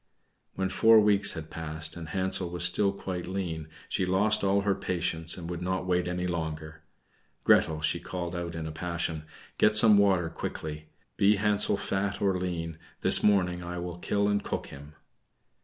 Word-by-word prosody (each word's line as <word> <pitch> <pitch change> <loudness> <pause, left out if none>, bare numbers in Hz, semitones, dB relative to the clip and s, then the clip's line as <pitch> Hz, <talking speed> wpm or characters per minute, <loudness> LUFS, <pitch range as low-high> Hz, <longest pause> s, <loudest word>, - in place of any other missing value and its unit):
When 95 0 -1
four 110 +2 +5
weeks 105 -1 +3
had 80 -2 -8
passed, 80 0 0
and 80 -3 -8
Hansel 95 +1 -1
was 85 0 -3
still 100 +3 +4
quite 95 -3 -6
lean, 85 -5 -4 0.2
she - - -1
lost 95 +4 +2
all 100 0 +2
her 100 0 +1
patience, 85 -3 -1
and 85 -2 -7
would 85 0 -5
not 95 +1 -2
wait 90 -1 0
any 90 0 -2
longer. 80 -2 -5 0.6
"Gretel," 80 -1 +3
she 75 - 0
called 90 -1 -5
out 85 -1 -5
in 80 -1 -5
a 80 - -5
passion, 85 -1 -3 0.3
"get 105 0 +4
some 105 -1 +6
water 95 -4 +3
quickly; 75 -1 -6 0.3
be 100 +2 +4
Hansel 105 0 +3
fat 100 0 -2
or 95 -2 +1
lean, 85 -3 -4 0.2
this - - +5
morning 90 -4 +2
I 90 +1 -6
will 90 0 -6
kill 100 +3 0
and 105 0 0
cook - - -4
him." 70 +2 -12
90 Hz, 175 wpm, -28 LUFS, 80-100 Hz, 0.6 s, some